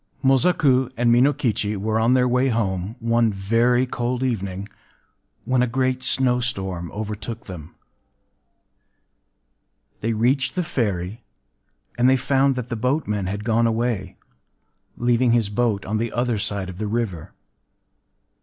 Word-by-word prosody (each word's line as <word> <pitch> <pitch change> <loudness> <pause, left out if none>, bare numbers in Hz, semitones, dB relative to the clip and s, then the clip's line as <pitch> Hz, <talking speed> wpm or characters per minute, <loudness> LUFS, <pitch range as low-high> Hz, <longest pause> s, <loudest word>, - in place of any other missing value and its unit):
Mosaku 135 -2 +3
and 120 0 +3
Minokichi 120 -5 +1
were 110 +3 -1
on 115 +3 +3
their 125 -1 +3
way 125 +2 +2
home, 100 -3 -1
one 115 -1 +2
very 115 +6 +2
cold 125 0 -2
evening, 100 -6 -3 0.8
when 130 -1 +2
a 125 - +2
great 130 +1 0
snowstorm 120 -10 0
overtook 110 +2 -6
them. 85 -4 -10 2.2
They 115 +1 -1
reached 130 +5 +1
the 180 - 0
ferry; 105 - -2 0.8
and 125 +2 +5
they 130 - +4
found 135 +1 +2
that 125 -1 -5
the 120 - -2
boatman 110 -5 -1
had 100 +2 -4
gone 115 +1 +2
away, 115 -5 -2 0.8
leaving 120 0 +2
his 115 -4 +2
boat 105 -2 0
on 110 +2 -1
the 115 0 -2
other 120 -3 -1
side 100 -1 -3
of 90 0 -9
the 110 - -2
river. 105 -7 -3
115 Hz, 135 wpm, -22 LUFS, 105-125 Hz, 2.2 s, and